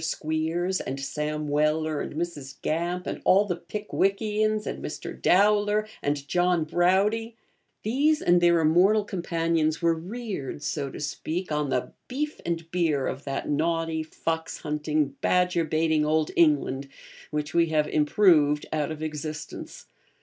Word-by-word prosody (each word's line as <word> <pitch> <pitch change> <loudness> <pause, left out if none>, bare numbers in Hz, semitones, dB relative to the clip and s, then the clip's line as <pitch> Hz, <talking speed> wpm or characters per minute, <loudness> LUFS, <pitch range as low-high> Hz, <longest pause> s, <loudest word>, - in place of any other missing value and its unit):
Squeers, 160 +4 -1
and 135 +1 -4
Sam 150 +2 -3
Weller, 155 +1 +1
and - - -6
Mrs. 150 -5 -5
Gamp, 175 +3 -1
and - - -4
all 200 +2 +5
the 180 -3 -1
Pickwickians, 210 +3 -1
and - - -5
Mr. - - -5
Dowler, 210 +2 +3
and 145 -1 -2
John 175 -1 +2
Browdie 195 +7 +1 0.5
these 290 +8 +2
and 175 0 +3
their 170 -1 +4
immortal 185 +7 +4
companions 165 -4 0
were 170 -1 +3
reared, 180 - -5
so 145 -1 -2
to - - -9
speak, 160 +4 -4
on 150 -1 0
the 125 - -1 0.2
beef 300 +4 -3
and 165 -1 -3
beer 160 -6 +1
of 135 +2 -4
that 135 -1 -3
naughty, 165 +1 0
fox 160 +1 -4
hunting, 150 -2 -1
badger 180 -2 +2
baiting 155 0 +1
old 155 0 +1
England, 140 -4 +2 0.4
which 150 -1 -3
we 170 -1 +4
have 155 -1 +1
improved 150 -2 +3
out 150 -2 0
of 155 0 -5
existence. 155 0 -6
165 Hz, 140 wpm, -26 LUFS, 150-180 Hz, 0.5 s, all